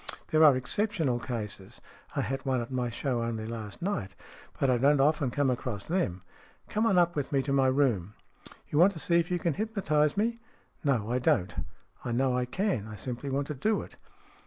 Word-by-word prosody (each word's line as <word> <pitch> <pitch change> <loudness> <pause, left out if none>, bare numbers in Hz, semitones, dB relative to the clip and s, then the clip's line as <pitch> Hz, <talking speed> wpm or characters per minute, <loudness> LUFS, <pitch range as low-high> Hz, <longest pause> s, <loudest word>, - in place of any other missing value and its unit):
There 155 0 +4
are 145 -4 +7
exceptional 155 - 0
cases 105 -6 -5 0.4
I - - +1
had 135 +4 -3
one 130 -2 +1
at 120 +2 -5
my 125 -2 -1
show 120 +1 -2
only 115 -1 -3
last 110 +2 -6
night 135 - -2 0.4
but 135 - +2
I 125 -2 +3
don't 140 +3 +4
often 145 -1 +3
come 135 +1 +1
across 120 -5 -3
them. 100 - -1 0.5
Come 220 +2 +1
on 195 -5 +3
up 175 -1 +3
with 145 -3 -2
me 135 -2 +2
to 140 - -1
my 135 -1 +4
room." 120 -8 +1 0.3
" - - -16
You 150 - +1
want 190 +4 +6
to 165 - -7
see 170 +3 +3
if 170 +1 -1
you 180 - +1
can 170 -2 0
hypnotize 180 -8 0
me? 230 +3 0
" - - -34
" - - -37
No, 120 -7 +1
I 125 - +1
don't. 95 -7 +2 0.5
I 120 - -3
know 130 +1 +2
I 125 0 +1
can. 125 - -1
I 110 - -8
simply 125 +6 -5
want 140 +1 0
to - - -1
do 210 +11 0
it." - - -13
135 Hz, 220 wpm, -29 LUFS, 120-160 Hz, 0.5 s, are